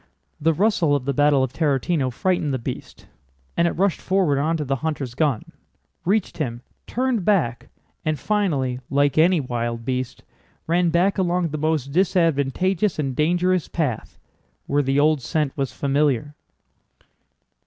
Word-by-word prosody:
The 160 Hz, +1 st, +2 dB
rustle 180 Hz, -6 st, +2 dB
of 135 Hz, -3 st, -2 dB
the 140 Hz, -, 0 dB
battle 145 Hz, -1 st, +3 dB
of 130 Hz, 0 st, -3 dB
Tarútino 145 Hz, -1 st, +1 dB
frightened 175 Hz, +2 st, 0 dB
the 130 Hz, -, 0 dB
beast, 115 Hz, -, -7 dB, 0.5 s
and 170 Hz, -, +3 dB
it -, -, -1 dB
rushed 195 Hz, 0 st, +1 dB
forward 180 Hz, -7 st, +1 dB
onto 155 Hz, +1 st, 0 dB
the 135 Hz, -1 st, -1 dB
hunter's 140 Hz, -3 st, -3 dB
gun, 140 Hz, -4 st, -1 dB, 0.5 s
reached 195 Hz, -1 st, 0 dB
him, 120 Hz, -5 st, -3 dB, 0.2 s
turned 250 Hz, -4 st, 0 dB
back, 160 Hz, -, +1 dB, 0.3 s
and 155 Hz, -1 st, 0 dB
finally—like 140 Hz, -, 0 dB
any 175 Hz, +2 st, +5 dB
wild 120 Hz, -3 st, -3 dB
beast—ran 130 Hz, +7 st, -3 dB
back 180 Hz, +4 st, +2 dB
along 175 Hz, -2 st, +1 dB
the 155 Hz, +1 st, -4 dB
most 155 Hz, -3 st, 0 dB
disadvantageous 180 Hz, +2 st, +1 dB
and 135 Hz, -4 st, -2 dB
dangerous 175 Hz, +3 st, +1 dB
path, 145 Hz, -9 st, -3 dB, 0.5 s
where 145 Hz, +1 st, +1 dB
the 135 Hz, 0 st, +1 dB
old 150 Hz, -1 st, +3 dB
scent 150 Hz, +1 st, -1 dB
was 135 Hz, -2 st, -2 dB
familiar. 145 Hz, -1 st, 0 dB
150 Hz, 140 wpm, -23 LUFS, 135-175 Hz, 0.5 s, any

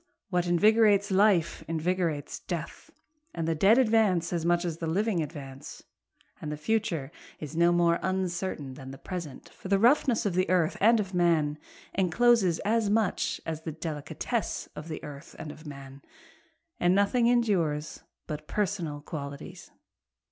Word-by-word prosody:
What 180 Hz, -1 st, +1 dB
invigorates 205 Hz, +2 st, +4 dB
life 190 Hz, -4 st, +3 dB
invigorates 165 Hz, -2 st, -1 dB
death, -, -, -6 dB, 0.5 s
And 165 Hz, -1 st, -2 dB
the 165 Hz, -, +2 dB
dead 195 Hz, +9 st, +5 dB
advance 215 Hz, -9 st, +3 dB
as 170 Hz, -2 st, -1 dB
much 175 Hz, 0 st, +2 dB
as 165 Hz, -2 st, -3 dB
the 165 Hz, -, -3 dB
living 195 Hz, +2 st, +1 dB
advance, 140 Hz, -3 st, -8 dB, 0.6 s
And 150 Hz, -, -4 dB
the 150 Hz, -, -4 dB
future 165 Hz, -5 st, -1 dB, 0.3 s
is 150 Hz, 0 st, -7 dB
no 170 Hz, +1 st, +4 dB
more 170 Hz, -1 st, +3 dB
uncertain 185 Hz, -6 st, -2 dB
than 130 Hz, 0 st, -10 dB
the 135 Hz, -, -9 dB
present, 170 Hz, -7 st, -7 dB
For -, -, -11 dB
the 195 Hz, +1 st, +3 dB
roughness 240 Hz, +2 st, +3 dB
of 200 Hz, -, 0 dB
the 185 Hz, +1 st, +1 dB
earth 180 Hz, -2 st, +2 dB
and 225 Hz, +2 st, +5 dB
of 195 Hz, -2 st, -3 dB
man 160 Hz, -4 st, +2 dB, 0.3 s
encloses 195 Hz, 0 st, +3 dB
as 220 Hz, 0 st, +2 dB
much 215 Hz, -2 st, 0 dB
as 160 Hz, -1 st, -4 dB
the 160 Hz, -, -5 dB
delicatesse 155 Hz, -2 st, -4 dB
of 150 Hz, -, -8 dB
the 160 Hz, -1 st, -6 dB
earth 145 Hz, 0 st, -10 dB
and 150 Hz, -, -7 dB
of 155 Hz, +1 st, -12 dB
man, 140 Hz, -1 st, -10 dB, 0.8 s
And 175 Hz, +1 st, +3 dB
nothing 230 Hz, +4 st, +3 dB
endures 180 Hz, -11 st, +1 dB, 0.2 s
but 150 Hz, -1 st, -6 dB
personal 180 Hz, -8 st, -2 dB
qualities. 140 Hz, -2 st, -8 dB
175 Hz, 155 wpm, -28 LUFS, 155-200 Hz, 0.8 s, dead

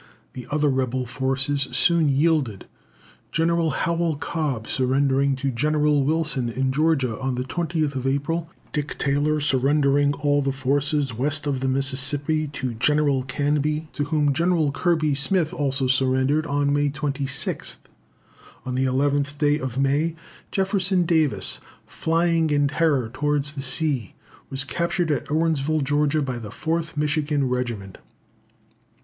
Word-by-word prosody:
The 125 Hz, -2 st, -8 dB
other 150 Hz, 0 st, +1 dB
rebel 130 Hz, -2 st, 0 dB
forces 135 Hz, +3 st, 0 dB
soon 170 Hz, -3 st, +3 dB
yielded 140 Hz, -, +1 dB, 0.7 s
General 165 Hz, 0 st, +1 dB
Howell 170 Hz, 0 st, 0 dB
Cobb 145 Hz, -5 st, -3 dB
surrendering 135 Hz, +1 st, +1 dB
to 135 Hz, +1 st, -2 dB
General 150 Hz, +2 st, +2 dB
Wilson 150 Hz, -4 st, 0 dB
in 130 Hz, +3 st, -1 dB
Georgia, 135 Hz, -5 st, +1 dB
on 130 Hz, -1 st, -2 dB
the 125 Hz, -, -2 dB
20th 155 Hz, -3 st, -2 dB
April; 165 Hz, +4 st, -2 dB, 0.2 s
Dick 150 Hz, -1 st, -3 dB
Taylor 150 Hz, +2 st, +1 dB
surrendering 140 Hz, 0 st, +2 dB
all 145 Hz, 0 st, +1 dB
the 135 Hz, 0 st, 0 dB
forces 140 Hz, 0 st, 0 dB
west 145 Hz, +6 st, 0 dB
of 140 Hz, -3 st, -1 dB
the 135 Hz, -, -1 dB
Mississippi 140 Hz, +3 st, 0 dB
to 135 Hz, -3 st, -4 dB
General 145 Hz, +3 st, +2 dB
Canby, 145 Hz, +4 st, -1 dB
to 145 Hz, -, -2 dB
whom 145 Hz, -2 st, +1 dB
General 165 Hz, -1 st, +1 dB
Kirby 155 Hz, 0 st, +1 dB
Smith 155 Hz, +3 st, +1 dB
also 135 Hz, -2 st, 0 dB
surrendered 130 Hz, +4 st, +2 dB
on 145 Hz, 0 st, +1 dB
May 145 Hz, 0 st, +2 dB
26th. 140 Hz, -1 st, -2 dB, 0.9 s
On 130 Hz, -, -3 dB
the 130 Hz, +1 st, +1 dB
11th 140 Hz, +2 st, 0 dB
day 150 Hz, 0 st, +2 dB
of 130 Hz, -1 st, -4 dB
May, 145 Hz, +4 st, +1 dB, 0.3 s
Jefferson 190 Hz, -2 st, +1 dB
Davis, 160 Hz, -4 st, +2 dB, 0.3 s
flying 165 Hz, 0 st, +1 dB
in 145 Hz, -1 st, +2 dB
terror 145 Hz, -7 st, +1 dB
towards 145 Hz, 0 st, 0 dB
the 140 Hz, -, -5 dB
sea, 135 Hz, -, -2 dB, 0.3 s
was 135 Hz, 0 st, -2 dB
captured 170 Hz, +3 st, -1 dB
at 145 Hz, -, -2 dB
Irwinsville, 155 Hz, -1 st, +1 dB
Georgia, 145 Hz, +1 st, +1 dB
by 130 Hz, -3 st, -3 dB
the 110 Hz, -3 st, -8 dB
4th 160 Hz, +5 st, -3 dB
Michigan 150 Hz, -2 st, 0 dB
Regiment. 120 Hz, -6 st, -3 dB
145 Hz, 135 wpm, -23 LUFS, 135-155 Hz, 0.9 s, soon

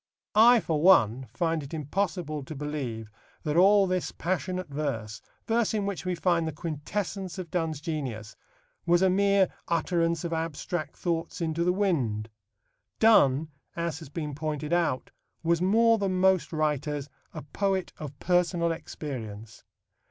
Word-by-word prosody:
I, 235 Hz, +3 st, +7 dB
for 155 Hz, -4 st, -1 dB
one, 130 Hz, -, +5 dB
find 165 Hz, +5 st, 0 dB
it 145 Hz, +3 st, -7 dB
impossible 160 Hz, 0 st, -2 dB
to 155 Hz, -, -7 dB
believe 135 Hz, -7 st, -4 dB, 0.3 s
that 150 Hz, -1 st, -1 dB
all 195 Hz, +3 st, +6 dB
this 185 Hz, -1 st, -1 dB
passionate 185 Hz, +1 st, -2 dB
verse 115 Hz, -8 st, -4 dB, 0.2 s
verse 225 Hz, -1 st, +1 dB
in 205 Hz, -2 st, 0 dB
which 195 Hz, -3 st, -4 dB
we 180 Hz, -, 0 dB
find 170 Hz, -2 st, +1 dB
the -, -, -2 dB
quintessence 175 Hz, +4 st, -4 dB
of 180 Hz, -3 st, -6 dB
Donne's 165 Hz, -4 st, -1 dB
genius 130 Hz, -9 st, -5 dB, 0.5 s
was 175 Hz, +2 st, +4 dB
a 190 Hz, -, +4 dB
mere 200 Hz, -1 st, +3 dB, 0.2 s
utterance 170 Hz, 0 st, 0 dB
of 170 Hz, -1 st, -3 dB
abstract 160 Hz, -1 st, -3 dB
thoughts 170 Hz, +2 st, -2 dB
into 165 Hz, 0 st, -1 dB
the 180 Hz, -, +3 dB
wind. 135 Hz, -, 0 dB, 0.7 s
Donne, 155 Hz, -9 st, +5 dB, 0.3 s
as 170 Hz, -2 st, -2 dB
has 160 Hz, -5 st, -10 dB
been 150 Hz, -1 st, -4 dB
pointed 150 Hz, +1 st, -3 dB
out, 170 Hz, -7 st, 0 dB, 0.3 s
was 170 Hz, 0 st, +2 dB
more 225 Hz, +4 st, +4 dB
than 190 Hz, -2 st, 0 dB
most 190 Hz, -1 st, +3 dB
writers 150 Hz, -2 st, -1 dB, 0.2 s
a -, -, -7 dB
poet 190 Hz, +5 st, -1 dB
of 145 Hz, -2 st, -7 dB
personal 175 Hz, -1 st, +1 dB
experience. 115 Hz, -9 st, -7 dB
165 Hz, 145 wpm, -28 LUFS, 150-185 Hz, 0.7 s, I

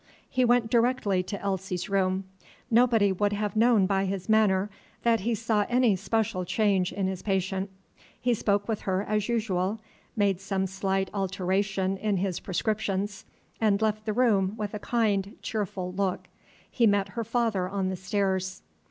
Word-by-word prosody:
He 255 Hz, -, +1 dB
went 240 Hz, -2 st, +3 dB
directly 235 Hz, -5 st, +2 dB
to 200 Hz, +2 st, -5 dB
Elsie's 190 Hz, -2 st, -3 dB
room. 190 Hz, -1 st, +1 dB, 0.5 s
Nobody 230 Hz, -4 st, +4 dB
would 205 Hz, +2 st, 0 dB
have 210 Hz, +1 st, -2 dB
known 225 Hz, -3 st, +4 dB
by 195 Hz, 0 st, +1 dB
his 190 Hz, -1 st, -3 dB
manner 210 Hz, -2 st, +3 dB, 0.3 s
that 230 Hz, -1 st, +3 dB
he 230 Hz, +4 st, 0 dB
saw 220 Hz, -2 st, +1 dB
any 245 Hz, -4 st, +3 dB
special 195 Hz, -1 st, -1 dB
change 195 Hz, -1 st, +1 dB
in 195 Hz, -, -2 dB
his 190 Hz, -1 st, -3 dB
patient. 190 Hz, 0 st, -1 dB, 0.5 s
He 245 Hz, -1 st, +1 dB
spoke 205 Hz, -2 st, 0 dB
with 225 Hz, -2 st, -2 dB
her 190 Hz, 0 st, -1 dB
as 210 Hz, +1 st, -1 dB
usual, 210 Hz, -3 st, 0 dB, 0.4 s
made 200 Hz, -3 st, +1 dB
some 195 Hz, -1 st, -1 dB
slight 190 Hz, 0 st, -1 dB
alteration 195 Hz, 0 st, -1 dB
in 205 Hz, 0 st, 0 dB
his 185 Hz, -1 st, -1 dB
prescriptions, 205 Hz, 0 st, -2 dB, 0.3 s
and 210 Hz, -3 st, +3 dB
left 215 Hz, -1 st, 0 dB
the 215 Hz, -, +1 dB
room 210 Hz, -5 st, +2 dB
with 210 Hz, -2 st, -4 dB
a 210 Hz, -, -4 dB
kind, 205 Hz, -3 st, 0 dB
cheerful 190 Hz, -4 st, -3 dB
look. 190 Hz, -1 st, -2 dB, 0.4 s
He 235 Hz, -3 st, +3 dB
met 200 Hz, -1 st, +2 dB
her 230 Hz, +2 st, -4 dB
father 225 Hz, -5 st, 0 dB
on 195 Hz, -1 st, -1 dB
the 190 Hz, -, -2 dB
stairs. 190 Hz, 0 st, -1 dB
200 Hz, 160 wpm, -27 LUFS, 190-220 Hz, 0.5 s, Nobody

